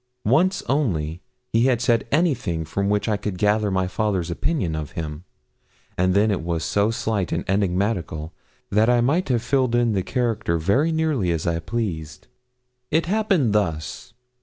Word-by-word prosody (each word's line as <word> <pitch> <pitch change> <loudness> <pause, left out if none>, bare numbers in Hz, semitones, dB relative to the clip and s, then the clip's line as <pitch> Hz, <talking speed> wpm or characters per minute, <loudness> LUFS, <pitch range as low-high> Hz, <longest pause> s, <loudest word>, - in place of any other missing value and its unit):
Once 175 - +3
only 90 - 0 0.3
he 115 +3 +4
had 125 -3 +2
said 120 -1 +1
anything 135 - +1
from 100 +5 -1
which 105 -1 0
I 105 -2 +1
could 100 -2 -4
gather 105 +1 +2
my 95 -1 0
father's 95 -3 -1
opinion 95 - -1
of 75 -2 -5
him, 80 +1 -6 0.7
and 90 +1 +1
then 105 +2 +4
it 95 - -1
was 85 -1 -2
so 100 +4 +1
slight 110 -4 -1
and 85 - -2
enigmatical 90 -4 -1 0.4
that 105 +3 +3
I 120 -1 +4
might 145 +9 +1
have 120 -3 +1
filled 130 -2 +1
in 120 -2 +2
the 95 - +1
character 105 -2 -1
very 115 - +2
nearly 155 - 0
as 80 -2 -2
I 85 -1 0
pleased. 85 -6 -4 0.6
It 160 +1 +2
happened 190 - +1
thus. 85 +1 -2
105 Hz, 165 wpm, -23 LUFS, 85-120 Hz, 0.7 s, he